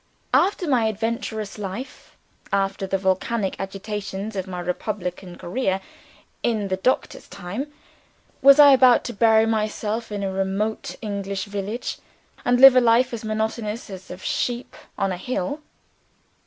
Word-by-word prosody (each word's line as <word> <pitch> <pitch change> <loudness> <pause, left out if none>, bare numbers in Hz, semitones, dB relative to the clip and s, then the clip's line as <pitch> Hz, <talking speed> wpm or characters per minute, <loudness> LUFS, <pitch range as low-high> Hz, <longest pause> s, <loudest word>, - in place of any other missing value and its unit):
After 380 -2 +2
my 250 -6 +3
adventurous 220 -1 -3
life 205 +6 -7 0.3
after 195 0 0
the 195 - 0
volcanic 190 +2 0
agitations 200 +1 -5
of 190 -1 -3
my 180 -1 -5
republican 180 0 -4
career 190 0 -1 0.6
in 215 -4 0
the 185 - 0
Doctor's 255 +7 -1
time 200 +10 -6 0.7
was 275 +1 +8
I 290 -1 +10
about 255 -2 +6
to 240 - -5
bury 220 0 +4
myself 220 0 -2
in 205 -1 -3
a 190 -1 -2
remote 195 +3 -2
English 200 -1 -3
village, 205 +3 -4 0.4
and 245 0 +2
live 270 0 +10
a 255 - +6
life 240 +2 +3
as 230 - -5
monotonous 220 0 -3
as 190 -1 -9
the - - -7
life 185 - -17
of - - -14
a - - -9
sheep 245 0 -2 0.2
on 195 -1 0
a 180 - -3
hill? 255 - -3
210 Hz, 155 wpm, -23 LUFS, 195-235 Hz, 0.7 s, I